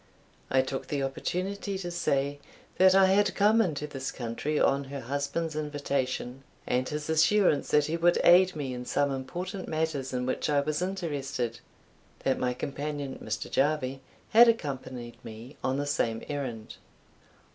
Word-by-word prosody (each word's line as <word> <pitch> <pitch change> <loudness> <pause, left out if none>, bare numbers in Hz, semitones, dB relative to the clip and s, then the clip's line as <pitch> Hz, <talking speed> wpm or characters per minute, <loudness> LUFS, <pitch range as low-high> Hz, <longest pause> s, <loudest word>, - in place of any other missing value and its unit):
I 130 0 +3
took 135 0 -4
the 140 -2 -1
opportunity 190 +8 -3
to 175 -2 -5
say, 145 -4 0 0.4
"That 185 0 +7
I 195 0 +7
had 195 +1 +3
come 215 +3 +4
into 155 -8 -1
this 135 -2 -5
country 130 +5 -2
on 140 0 +2
her 140 0 -6
husband's 140 +5 -2
invitation, 140 -4 -2 0.2
and 125 +1 0
his 150 0 -4
assurance 160 +1 +3
that 150 -1 +4
he 160 +3 -1
would 175 +1 +3
aid 185 +1 +6
me 140 -4 -3
in 125 0 -5
some 145 +2 +1
important 180 +8 -5
matters 155 -4 -2
in 125 -1 -2
which 130 - -1
I 145 -1 +3
was 150 +3 -2
interested; 145 -10 -3 0.6
that 135 - +1
my 125 -1 0
companion, 145 0 -4
Mr. 110 0 -3
Jarvie, 135 -2 0 0.3
had 235 +2 +8
accompanied 130 - -2
me 115 +5 -10
on 130 +1 0
the 145 - -1
same 115 -6 -1
errand." 130 -7 -5
145 Hz, 155 wpm, -28 LUFS, 130-170 Hz, 0.6 s, had